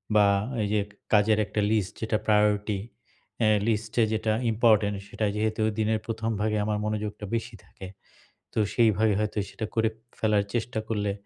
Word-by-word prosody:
বা 105 -1 +6 0.4
এই - - 0
যে, 105 - +3 0.3
কাজের 105 +1 +5
একটা 105 +2 -3
list 105 -4 0
যেটা 110 -1 0
priority 105 -1 +2 0.6
অ্যা 110 - +3 0.2
list 110 -1 0
যে 115 - +5
যেটা 110 0 0 0.2
important 110 -2 +3
সেটা 110 - -2
যেহেতু 110 +1 -1 0.2
দিনের 110 0 +1
১ম 110 0 -3
ভাগে 105 0 +1
আমার 105 0 0
মনোযোগটা 105 0 -3
বেশি 115 0 -4
থাকে 95 - -11 0.7
তো - - -9 0.2
সেইভাবে 110 -2 +3
হয়তো 105 0 -2
সেটা 110 - -5
করে 110 -1 +3 0.3
ফেলার 105 -2 +2
চেষ্টা 115 -1 -1
করলে 105 -2 -1
110 Hz, 160 wpm, -27 LUFS, 105-110 Hz, 0.7 s, বা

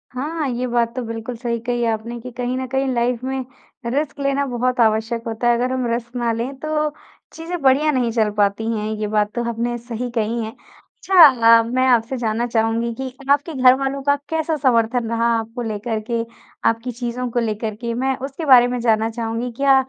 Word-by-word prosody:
हाँ। 300 +3 -2
ये 245 +1 -2
बात 235 -1 0
तो 255 - -2
बिल्कुल 230 +2 -5
सही 235 -1 -2
कही 240 0 -1
आपने 230 +1 -2
कि 250 +2 -8
कहीं 250 +1 -2
न 260 - -3
कहीं 265 +1 -1
लाइफ़ 240 +1 0
में 265 -1 -3 0.4
रिस्क 280 +4 -2
लेना 275 0 0
बहुत 250 -1 -1
आवश्यक 225 +1 +1
होता 225 +1 -2
है। 240 - +5
अगर 250 +2 0
हम 260 -1 -1
रिस्क 235 +1 -4
ना 240 -1 0
लें 235 +4 -3
तो 305 0 -1 0.4
चीज़ें 335 +1 -5
बढ़िया 275 +3 +4
नहीं 250 -4 0
चल 220 -2 +1
पाती 205 +2 +1
हैं 210 0 -3
ये 210 - -1
बात 210 0 +1
तो 240 - -1
आपने 235 +1 -2
सही 240 +1 -5
कही 230 +1 0
है। 220 - -4
अच्छा 375 +9 0 0.4
अ, - - +2
मैं 255 +3 0
आपसे 240 +1 +2
जानना 230 0 -1
चाहूँगी 230 0 0
कि 260 +2 -6 0.2
आपके 285 +3 +2
घरवालों 270 +1 +3
का 285 - +5
कैसा 320 0 0
समर्थन 235 -3 +1
रहा 230 0 0
आपको 225 +2 -6
लेकर 220 0 -3
के, 230 -1 0 0.5
आपकी 230 +2 -3
चीज़ों 245 +1 -4
को 240 - 0
लेकर 220 -1 -2
के 235 +1 -4
मैं 265 +3 0
उसके 280 +4 -6
बारे 250 -4 +7
में 245 0 -2
जानना 225 -1 +2
चाहूँगी। 230 +1 -3
क्या 275 0 +4
240 Hz, 200 wpm, -20 LUFS, 230-260 Hz, 0.5 s, बारे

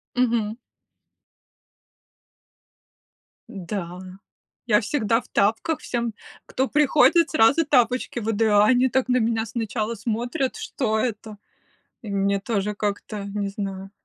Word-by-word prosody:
Мгм. 230 -4 +1 3.0
Да, 180 -3 -6 0.7
я 210 -3 +4
всегда 230 -1 0
в - - -20
тапках! 225 +10 0
Всем, 235 -2 -3 0.3
кто 265 - -1
приходит, 300 +4 +4
сразу 285 +3 +4
тапочки 250 -3 +1
выдаю. 220 -1 +1
А 205 - +6
они 255 +3 +4
так 260 +1 0
на 250 - +4
меня 225 -1 0
сначала 225 0 -3
смотрят, 240 +6 -2
что 220 -5 -2
это? 220 -2 -3 0.6
И 225 - -10
мне 200 0 0
тоже 210 -1 -2
как-то, 205 0 -4
не 200 0 -3
знаю. 195 -1 -6
225 Hz, 115 wpm, -23 LUFS, 205-250 Hz, 3.0 s, А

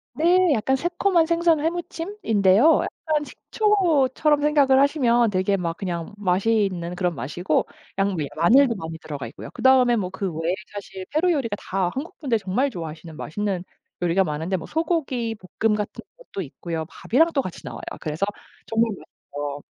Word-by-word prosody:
네 355 +1 +4
약간 265 +2 +1
새콤한 345 +3 +2
생선 335 -1 +3
회무침인데요. 325 - +2
약간 310 -2 -2
식초처럼 310 - +1
생각을 285 -3 +4
하시면 245 -5 +3
되게 190 +1 +1
막 170 -2 -2
그냥 175 -1 -4
맛이 205 +3 +2
있는 170 -1 -5
그런 180 -2 -1
맛이고 155 +5 -1 0.3
양비 190 -7 0
마늘도 235 - +5
많이 160 -2 -6
들어가 145 -5 -6
있고요. - - -10
그다음에 255 -2 +5
뭐 190 -5 -2
그 190 -1 -3
외에 165 +2 -1 0.2
사실 195 -2 -7
페루 335 +4 +2
요리가 255 -10 -1
다 190 -2 -1
한국분들 280 - -2
정말 215 +7 0
좋아하시는 160 - -8
맛있는 195 +1 -3 0.4
요리가 175 +2 +3
많은데 160 +3 -2
뭐 170 - -8
소고기볶음 245 - -1
같은 210 -1 -5
것도 - - -6
있고요. 160 +2 -5
밥이랑 320 +8 +2
또 275 - +2
같이 185 -8 -7
나와요. - - -7 0.2
그래서 155 +2 -3 0.4
정말 225 0 +1
맛있죠. 145 -6 -7
220 Hz, 360 characters per minute, -23 LUFS, 180-295 Hz, 0.4 s, 마늘도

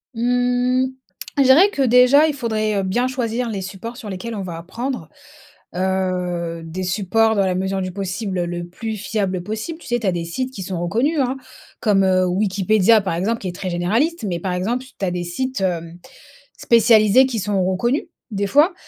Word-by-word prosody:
Mmh, 245 +2 +1 0.5
je - - +7
dirais 275 +10 +6
que 280 - -2
déjà 250 +4 +6
il 300 - -2
faudrait, 215 -4 -1
heu, 195 - 0
bien 240 +7 0
choisir 245 -2 -2
les 200 -3 -3
supports 195 +5 -7
sur 210 - -8
lesquels 225 +5 -5
on 200 - -4
va 175 -3 -6
apprendre, 190 - -5 0.7
heu, 180 -3 -1
des 180 +3 -5
supports 220 +4 +2
dans 200 -2 +2
la 185 -1 0
mesure 190 0 -1
du 185 - -3
possible 190 -1 -3
le 175 0 -4
plus 220 +5 -5
fiable 195 -3 -2
possible. 220 - -5
Tu - - -12
sais? 240 0 +1
Tu 215 - -3
as 185 - +2
des 170 -1 -3
sites 255 +10 -4
qui 195 - -7
sont 180 -1 -4
reconnus, 235 - 0
hein, 260 +1 0 0.4
comme, 200 -3 +3
heu, 185 -1 +3
Wikipédia 200 +3 +3
par 190 -3 -2
exemple 210 +7 -1
qui 185 - -4
est 175 - -6
très 185 0 -4
généraliste 225 - 0
mais 175 -2 -2
par 185 +1 -3
exemple 230 +8 -1
tu 255 -6 -7
as 180 - 0
des 175 0 -3
sites, 255 +7 -3
hem, 170 -2 -2 0.6
spécialisés 230 +1 +5
qui 250 -4 -2
sont 200 -1 0
reconnus 235 - 0 0.3
des 200 0 -1
fois. 300 - +4
205 Hz, 195 wpm, -20 LUFS, 185-245 Hz, 0.7 s, je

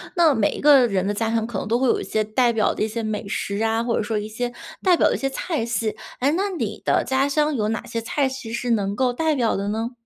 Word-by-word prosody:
那 330 -4 +5
每 220 -4 +2
一 - - -6
个 280 -4 +6
人 195 -4 0
的 205 - 0
家 225 +2 -1
乡 225 -1 +1
可 235 -5 -5
能 - - -4
都 230 +3 +1
会 260 - +2
有 - - +2
一 - - -4
些 215 0 0
代 235 +3 +2
表 220 -2 +2
的 - - -2
一 - - +1
些 230 +2 -4
美 215 -2 -3
食 200 0 -3
啊， 225 +1 +1
或 235 -1 0
者 - - 0
说 215 +1 -2
一 210 0 -3
些 240 +3 -3 0.3
代 370 -2 +5
表 - - +4
的 - - 0
一 - - -2
些 270 - -1
菜 280 -1 -2
系， 225 -2 -1 0.2
诶， 270 +3 +2
那 385 +6 0
你 365 -4 -4
的 - - +2
家 265 +1 +1
乡 300 +1 +1
有 215 -3 0
哪 225 - -3
些 230 - -4
菜 270 +4 0
系 260 -3 -7
是 240 +1 -2
能 200 -3 0
够 255 +2 +1
代 315 +4 +1
表 240 -4 +1
的 200 +1 -2
呢？ 225 +3 -2
230 Hz, 315 characters per minute, -23 LUFS, 215-265 Hz, 0.3 s, 个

